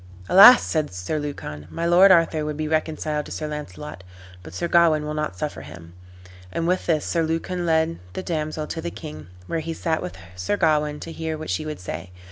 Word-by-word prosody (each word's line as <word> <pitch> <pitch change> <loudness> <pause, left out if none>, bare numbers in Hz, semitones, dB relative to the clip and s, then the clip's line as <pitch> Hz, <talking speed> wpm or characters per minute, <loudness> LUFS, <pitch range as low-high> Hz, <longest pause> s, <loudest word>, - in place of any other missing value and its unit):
"Alas!" 205 +7 +9
said 155 -2 -1
Sir 90 +12 -3
Lucan, 75 - -6
"my 165 - -3
lord 175 +3 +7
Arthur 165 -3 +4
would 150 -1 -4
be 155 0 -2
reconciled 155 -1 -1
to - - -11
Sir 155 - -4
Launcelot, 90 - -7 0.4
but 80 - -11
Sir 170 - -2
Gawain 165 -3 +4
will 150 - -3
not 150 0 -3
suffer 150 - -4
him." 85 +3 -12 0.6
And 165 - -2
with 185 +1 0
this 155 -3 +1
Sir 170 - 0
Lucan 165 +2 -2
led 160 0 +1
the - - -5
damsel 155 -3 -3
to 160 +2 -5
the 170 - -3
king, 155 - -9 0.2
where 165 - -2
he 165 +1 -4
sat 160 -1 -1
with 90 +1 -6 0.2
Sir 90 - -1
Gawain, 150 -3 +1
to 165 - -7
hear 160 -1 -4
what 155 - -5
she 155 - -2
would 155 - -5
say. 90 0 -6
155 Hz, 210 wpm, -23 LUFS, 150-165 Hz, 0.6 s, Alas